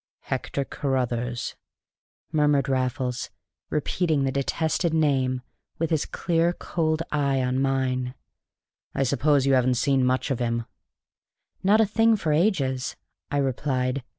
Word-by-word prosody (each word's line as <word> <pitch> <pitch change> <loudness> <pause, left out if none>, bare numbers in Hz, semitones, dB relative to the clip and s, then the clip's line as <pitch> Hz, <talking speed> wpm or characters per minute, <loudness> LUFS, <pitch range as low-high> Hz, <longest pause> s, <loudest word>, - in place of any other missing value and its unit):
"Hector 140 - -3
Carruthers!" 125 -4 -2 0.8
murmured 145 -3 +3
Raffles, 130 -1 -1 0.4
repeating 155 0 0
the 135 - +1
detested 160 +4 0
name 130 -5 +1 0.3
with 165 0 -1
his 155 -3 +1
clear, 170 0 +1
cold 160 -2 -1
eye 140 -3 +1
on 125 +1 0
mine. 130 -1 0 0.8
"I 135 - +2
suppose 140 +1 +2
you 135 - +3
haven't 130 -1 +3
seen 135 +2 +2
much 130 +2 +1
of 130 - -1
him?" 115 -1 -1 1.0
"Not 210 +4 +5
a - - +5
thing 225 +2 +3
for 165 -7 0
ages," 145 -7 +1 0.3
I 145 - -1
replied. 130 -1 0
135 Hz, 125 wpm, -25 LUFS, 130-155 Hz, 1.0 s, Not